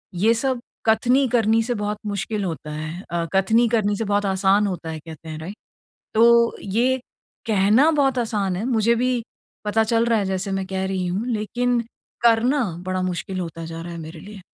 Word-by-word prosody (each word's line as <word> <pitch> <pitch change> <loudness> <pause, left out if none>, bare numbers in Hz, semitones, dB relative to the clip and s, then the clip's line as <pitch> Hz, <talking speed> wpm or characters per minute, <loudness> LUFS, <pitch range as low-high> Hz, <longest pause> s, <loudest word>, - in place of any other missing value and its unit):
ये 215 +6 +4
सब 255 +1 -1 0.2
कथनी 245 +5 +3
करनी 225 -1 +3
से 245 +2 -1
बहुत 210 -1 -2
मुश्किल 205 +1 -2
होता 160 -4 -4
है 155 +4 -5
अ, 170 -1 -1
कथनी 220 +5 +3
करनी 210 -3 +1
से 225 - -2
बहुत 205 0 +1
आसान 195 +1 +3
होता 175 -4 -4
है 160 -1 -5
कहते 160 0 -11
हैं 155 0 -6
राइट 175 +6 -7 0.6
तो 235 +1 +5
ये 235 +6 +1 0.5
कहना 215 +7 +4
बहुत 275 -4 +2
आसान 210 -6 -1
है, 200 - -3
मुझे 235 -2 +2
भी 250 0 0 0.4
पता 220 +1 +2
चल 230 +1 +2
रहा 230 -1 +3
है 205 - 0
जैसे 190 +1 -2
मैं 195 0 -2
कह 190 0 -2
रही 190 -1 -2
हूँ 190 +6 -2
लेकिन 240 +2 0 0.4
करना 240 +4 +4 0.2
बड़ा 185 0 -1
मुश्किल 185 +1 -3
होता 165 -1 -6
जा 165 0 -7
रहा 170 0 -7
है 170 - -7
मेरे 160 0 -8
लिए। 205 +3 -11
210 Hz, 195 wpm, -22 LUFS, 185-235 Hz, 0.6 s, तो